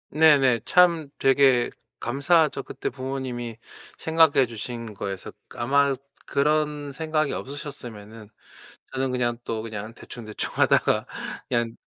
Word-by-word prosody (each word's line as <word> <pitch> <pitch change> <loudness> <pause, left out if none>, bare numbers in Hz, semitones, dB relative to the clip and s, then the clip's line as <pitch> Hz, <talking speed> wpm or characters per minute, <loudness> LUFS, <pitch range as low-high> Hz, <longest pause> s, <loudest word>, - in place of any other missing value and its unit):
네네. 140 -6 +5
참 170 -4 +4
되게 135 -2 +4 0.3
감사하죠. 150 +5 +2
그때 - - -4
부모님이 130 -3 -4 0.4
생각해 160 -4 +4
주신 115 -1 -6
거에서 95 -1 -5 0.2
아마 140 +3 +2 0.3
그런 150 0 0
생각이 155 0 -1
없으셨으면은 115 -6 -8 0.7
저는 130 0 -1
그냥 120 -2 0
또 110 -1 -3
그냥 110 0 -6
대충 120 0 -10
대충하다가 105 -1 +1 0.4
그냥, 120 -2 0
130 Hz, 265 characters per minute, -25 LUFS, 115-145 Hz, 0.7 s, 네네